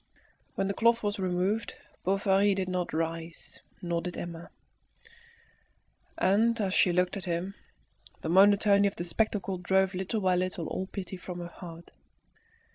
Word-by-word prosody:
When 195 - 0
the 200 - -1
cloth 230 +2 +3
was 205 0 -1
removed, 185 +4 0 0.3
Bovary 195 +1 +3
did 190 -1 -1
not 180 -1 -2
rise, 165 +1 -4 0.2
nor 170 -1 -1
did 175 +1 -5
Emma; 170 -1 -6 1.7
and 225 +5 +3
as 195 -3 0
she 180 - +4
looked 180 +2 +1
at 190 - -6
him, 175 +2 -2 0.7
the - - -4
monotony 200 +2 +5
of 200 - -3
the 175 - -4
spectacle 195 0 -1
drove 190 +1 +2
little 190 +4 -2
by 185 -1 +3
little 180 -2 -1
all 190 - -3
pity 190 -1 -6
from 180 0 -7
her 175 - -5
heart. 170 -1 -11
185 Hz, 150 wpm, -29 LUFS, 175-200 Hz, 1.7 s, monotony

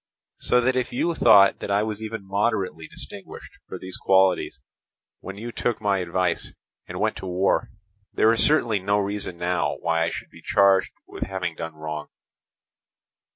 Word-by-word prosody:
So 125 - +2
that 130 +1 +1
if 130 -1 -1
you 170 +7 0
thought 100 -9 +6
that - - -6
I 100 +1 +2
was 110 -1 -4
even 110 -2 -6
moderately 95 -5 -1
distinguished - - -9
for - - -6
these 95 0 -7
qualities 95 -7 +2 0.6
when 95 0 -8
you 120 +3 -6
took 120 -1 -2
my 100 -2 +1
advice 90 -1 -1 0.3
and - - -6
went - - 0
to 95 - -7
war, 90 +2 +1 0.4
there 110 +1 +4
is 115 - +3
certainly 120 -9 +2
no 100 +2 +1
reason 100 -3 -3
now 90 +1 0
why 85 -1 0
I 85 - 0
should - - -7
be - - -15
charged 95 -1 +3
with - - -11
having 95 -3 -3
done 80 -1 -6
wrong. 75 -1 -6
95 Hz, 170 wpm, -24 LUFS, 90-110 Hz, 0.6 s, thought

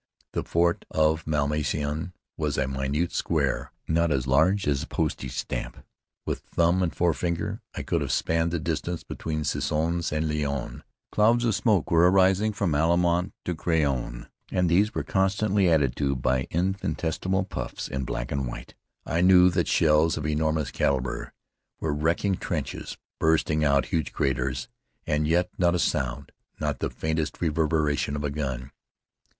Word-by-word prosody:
The - - 0
fort 85 0 +1
of 80 +1 +1
Malmaison 75 +2 -1 0.2
was 75 -2 -2
a 70 - +1
minute 70 +5 -1
square, - - -1 0.2
not 85 0 +2
as 65 -3 0
large 80 +10 +3
as 70 -2 +1
a - - -6
postage 65 -2 -2
stamp. - - -4 0.4
With - - -2
thumb 85 +2 +1
and 90 -3 +1
forefinger 85 +1 -1
I - - -4
could - - 0
have - - -2
spanned 80 +1 +1
the 85 - -1
distance 85 +1 -3
between 75 -1 -4
Soissons 80 +4 -1
and 75 +1 0
Laon. 75 -2 -3 0.3
Clouds 115 +3 +3
of 115 - +2
smoke 105 - +1
were 85 +1 +6
rising 95 +3 +4
from 100 -6 -1
Allemant 85 +4 +2
to 90 - -1
Craonne, 70 -8 -1 0.2
and 90 -1 +1
these 100 +5 +3
were 80 - -1
constantly 95 +2 +2
added 75 -6 +2
to 70 -1 0
by 65 0 0
infinitesimal 90 +1 -1
puffs - - -5
in 65 0 -3
black 60 -1 -4
and 70 -2 -1
white. - - -8 0.3
I 85 - 0
knew 90 0 +7
that 85 -1 0
shells 80 0 +3
of 75 - -4
enormous 75 0 0
calibre 65 -2 -1 0.5
were 80 -2 -1
wrecking 85 +6 +1
trenches, - - -4 0.2
blasting 80 -1 +2
out 70 -2 +3
huge 80 -4 -2
craters; 65 -1 -1 0.4
and 75 0 +1
yet 85 +3 +2
not 90 -1 +3
a - - +2
sound, 65 -4 -1 0.3
not 75 -3 -2
the - - -1
faintest 80 -1 -2
reverberation 75 -3 +1
of 75 - -3
a 75 - -1
gun. 70 -3 -4
80 Hz, 155 wpm, -26 LUFS, 70-85 Hz, 0.5 s, knew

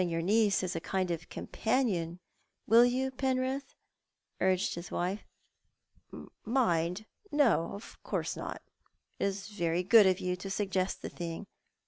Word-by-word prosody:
yonr 165 -2 -1
niece 205 +1 +3
as 180 -2 -2
<a - - 0
kind 185 +1 -1
of 165 -1 -4
com - - -6
panion, 195 -9 0 0.5
will 230 +3 +7
you, 255 +2 +1
Penrith?" 260 +1 -1 0.7
urc:ed 185 0 +2
his 170 +1 -7
wife. 185 +4 -2 0.7
" - - -13 0.2
Mind? 210 -6 +1 0.3
No, 250 - +3
of 205 - -11
course - - -2
not. - - -6 0.6
It - - +1
is 195 +1 -3
very 175 -4 0
good 205 +2 +7
of 185 0 +2
you 180 -1 -1
to 195 +2 -6
suggest 190 -2 -1
the - - -4
thing. 170 +2 -6
195 Hz, 150 wpm, -31 LUFS, 175-230 Hz, 0.7 s, will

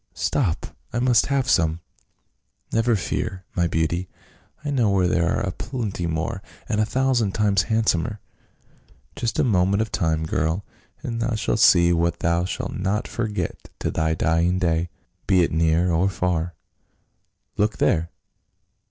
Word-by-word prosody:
Stop, 105 - -1 0.2
I 120 - -3
must 120 -1 +3
have 140 -2 0
some 80 -7 +2 0.3
!" - - -48
" - - -28
Never 115 +1 +3
fear, 95 -1 -3
my 85 -1 +2
beauty, 85 +2 -1 0.6
I 145 - -1
know 120 -6 +2
where 95 -2 +2
there 85 -1 +1
are - - 0
a 100 -3 -1
plenty 105 -6 -4
more, 85 +4 -2 0.3
and 105 -2 +1
a 110 - +1
thousand 125 -5 +1
times 100 -4 +2
handsomer. 110 -2 +1 1.0
Just 115 - -2
a - - +3
moment 100 -3 +2
of 110 - -8
time, 80 -3 0
girl, 80 +4 -1 0.4
and 115 -1 -3
thou 115 0 0
shalt 110 0 -1
see 85 -4 +6
what 85 0 0
thou 85 +1 +1
shalt 90 - -4
not 100 +3 -1
forget 110 -3 -4
to - - -2
thy 80 0 0
dying 85 +3 +2
day 85 -1 0 0.2
— - - -44
be 95 -2 +4
it - - 0
near 80 +2 +2
or 85 +4 +2
far. 90 -2 -1 1.0
Look 105 +1 0
there 85 +1 +1
90 Hz, 160 wpm, -23 LUFS, 85-110 Hz, 1.0 s, see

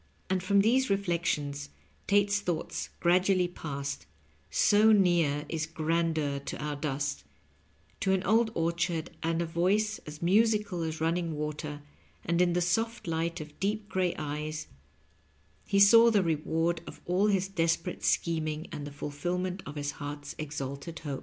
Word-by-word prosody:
And 190 -1 +1
from 200 +2 +4
these 255 +5 +3
reflections 165 -7 -1 0.4
Tate's 205 0 +3
thoughts 175 -5 -3
gradually 180 +1 +3
passed 140 -5 -5
— - - -34
'* - - -36
so 220 - +5
near 170 -7 +3
is 160 -2 -2
grandeur 160 -3 0
to 140 - -6
our 150 0 -3
dust 140 - -2 0.2
" - - -36
— - - -35
^to 190 - +2
an 190 0 +2
old 220 +3 +3
orchard 165 0 -1
and 165 +1 0
a - - -2
voice 195 +6 +1
as 150 0 -8
musical 205 0 +2
as 160 -1 -3
running 165 0 0
water, 150 0 -4 0.4
and 170 +1 +2
in 175 -1 +3
the 180 - +1
soft 225 +7 0
light 165 0 -1
of 150 -1 -11
deep 205 +1 -1
gray 185 -2 0
eyes 150 +1 -4 1.0
he 200 - +2
saw 230 +4 +8
the 205 -4 +3
reward 165 +1 0
of - - -9
all 185 +4 +2
his 195 -2 +2
desperate 170 -1 -1
scheming 160 -1 0
and 145 -1 -5
the - - -8
fulfillment 180 +6 -3
of 145 - -7
his 145 -1 -2
heart's 145 0 -7
exalted 140 +1 -5
hope. 140 -3 -5
170 Hz, 160 wpm, -29 LUFS, 150-190 Hz, 1.0 s, saw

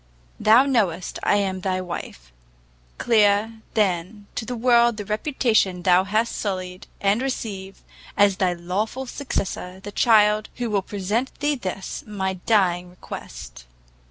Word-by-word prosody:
Thou 230 +5 +6
knowest 195 -10 0
I - - +2
am 190 -2 -1
thy 185 0 -1
wife! 170 - -7 0.7
clear, 220 0 +2
then, 200 0 0
to 225 - -4
the 245 - -4
world 235 -1 +4
the 205 - -5
reputation 215 -5 +1
thou 185 +1 +4
hast 220 +4 0
sullied, 185 -2 -4
and 200 +4 +2
receive, 200 -7 -5 0.3
as 200 -2 +4
thy 185 -2 +1
lawful 195 +9 -3
successor, 190 -8 -4
the 205 +2 -8
child 215 -1 +4
who 240 -2 -3
will 200 -2 +2
present 205 +6 -3
thee 295 +1 +1
this, 195 -7 -5
my 190 -2 -2
dying 180 -2 +1
request! - - -10
205 Hz, 135 wpm, -23 LUFS, 185-225 Hz, 0.7 s, Thou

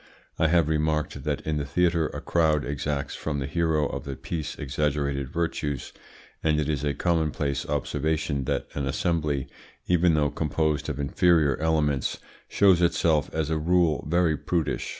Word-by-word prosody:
I 80 - +4
have 85 -1 +3
remarked 75 -2 -1
that 75 -2 -1
in 80 -1 -2
the 75 - -1
theatre 85 +1 +2
a - - -7
crowd 80 -3 +2
exacts 70 0 -3
from 75 -2 -3
the 70 - -2
hero 80 0 +1
of - - -5
the 70 -2 -5
piece 80 +1 -5
exaggerated 70 -1 -1
virtues, 75 -3 -3 0.5
and 75 -1 +2
it 75 - 0
is 75 -2 -1
a 70 -2 0
commonplace 75 -4 0
observation 75 -1 -1
that - - -1
an 70 -1 -2
assembly, 75 -3 -1 0.4
even 90 -2 +3
though 75 -1 +2
composed 75 -1 -1
of - - -4
inferior 75 0 +3
elements, 75 -4 0 0.3
shows 95 -4 +4
itself 80 -3 +2
as 80 -1 -2
a 80 - +1
rule 85 -3 +2
very 85 -1 +3
prudish. 75 +3 -2
75 Hz, 160 wpm, -26 LUFS, 70-80 Hz, 0.5 s, I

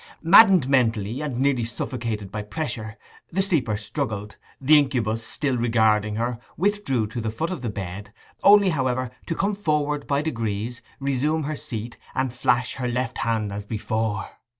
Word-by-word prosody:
Maddened 185 - +7
mentally, 115 -2 +1
and 145 -5 -3
nearly 130 -2 +2
suffocated 115 -3 -4
by 105 - -3
pressure, 110 -2 -4 0.3
the 180 - -2
sleeper 150 - +1
struggled; 105 -2 -3 0.2
the 150 +3 +6
incubus, 115 -5 0
still 135 +3 -1
regarding 110 -3 +2
her, 120 +1 -2 0.2
withdrew 190 - +1
to 115 +3 -5
the 110 - -2
foot 160 +11 -3
of 180 - -4
the 120 - -2
bed, 100 +1 -6 0.3
only, 200 -1 +7
however, 130 -4 -1 0.2
to 165 - -1
come 200 +4 0
forward 150 -6 -1
by 140 +1 +1
degrees, 115 -4 -3 0.2
resume 140 +3 0
her 155 +2 -3
seat, 115 -3 -6 0.2
and 130 -2 0
flash 125 0 +1
her 125 -2 -2
left 125 0 -2
hand 110 -3 -1
as 100 0 -6
before. 110 0 -2
125 Hz, 160 wpm, -24 LUFS, 110-145 Hz, 0.3 s, Maddened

